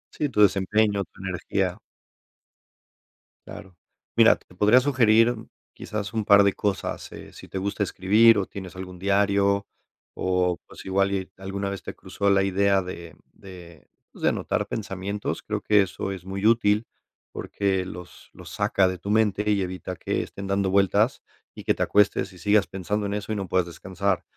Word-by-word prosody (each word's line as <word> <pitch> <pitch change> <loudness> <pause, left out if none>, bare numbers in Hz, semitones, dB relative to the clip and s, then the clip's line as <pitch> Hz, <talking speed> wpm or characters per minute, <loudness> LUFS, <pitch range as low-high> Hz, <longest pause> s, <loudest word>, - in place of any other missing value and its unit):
Sí, 150 - -1
tu 105 -5 +1
desempeño, 100 +1 +3
tu - - -17
energía. 95 -2 -2 1.7
Claro. 95 -2 -11 0.4
Mira, - - +6
te 90 - -22
podría 105 +6 +5
sugerir 120 -3 +3 0.4
quizás 105 -3 -5
un 110 -1 -1
par 100 0 +6
de 100 - +3
cosas, 100 -2 -3
eh, - - -11
si - - -12
te - - -5
gusta 100 +2 -2
escribir 105 +4 +4
o 95 - 0
tienes 95 -2 -9
algún 90 -1 -8
diario 100 0 +2 0.5
o, 90 -1 0
pues, - - -13
igual 95 +1 +1
y 95 -1 -2
alguna 95 +1 -4
vez 100 -2 -6
te - - -6
cruzó 100 0 -2
la 95 -1 +4
idea 100 0 +2
de 85 -3 -8 0.2
de, 90 -4 -13 0.2
pues, - - -16
de - - +5
anotar - - -1
pensamientos, 100 -1 -4
creo - - -3
que 105 -1 +4
eso 95 0 -3
es 95 -2 -9
muy 95 +1 -4
útil, 110 -1 +3 0.5
porque 95 -2 -1
los 90 -1 -11
los - - -12
saca 95 -1 +2
de 95 - -3
tu 100 - -7
mente 105 -1 +2
y 100 -1 +1
evita 90 0 -5
que - - -2
estén 100 0 -8
dando 100 0 0
vueltas 100 +5 +2 0.3
y - - -9
que - - +3
te - - -1
acuestes 100 -2 +2
y 90 - -14
sigas 105 +3 +2
pensando 100 +2 -3
en 100 - -3
eso 105 +1 -4
y - - -2
no 100 -2 -4
puedas 90 -1 +2
descansar. 95 +3 -2
100 Hz, 175 wpm, -25 LUFS, 95-105 Hz, 1.7 s, Mira